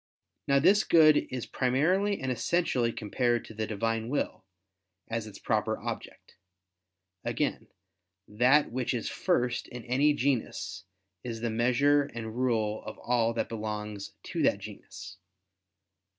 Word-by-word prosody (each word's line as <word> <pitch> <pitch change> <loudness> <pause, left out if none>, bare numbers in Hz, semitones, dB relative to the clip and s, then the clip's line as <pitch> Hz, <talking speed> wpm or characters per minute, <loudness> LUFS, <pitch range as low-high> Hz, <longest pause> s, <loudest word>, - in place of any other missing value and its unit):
Now 140 - +4
this 195 +9 +5
Good 155 -2 +5
is 125 -2 -4
primarily 180 +11 +1
and 130 -1 -2
essentially 125 -3 +1
compared 120 +2 0
to - - -11
the 110 0 -3
Divine 115 +2 -1
will, 140 -7 -2 0.6
as 115 -1 -3
its 100 -2 -10
proper - - 0
object. - - -7 0.9
Again, - - -2 0.6
that 125 +7 +3
which 125 0 -1
is 115 - -2
first 125 -10 0
in 125 -1 -8
any 140 +4 +3
genus 125 -8 -2 0.4
is 115 -2 -5
the 115 -1 -1
measure 125 +6 +3
and 110 -1 -5
rule 110 -4 0
of - - -8
all 120 -2 +1
that - - -1
belongs 105 -2 -5
to - - -3
that - - +3
genus. 95 +2 -10
120 Hz, 135 wpm, -29 LUFS, 110-140 Hz, 0.9 s, this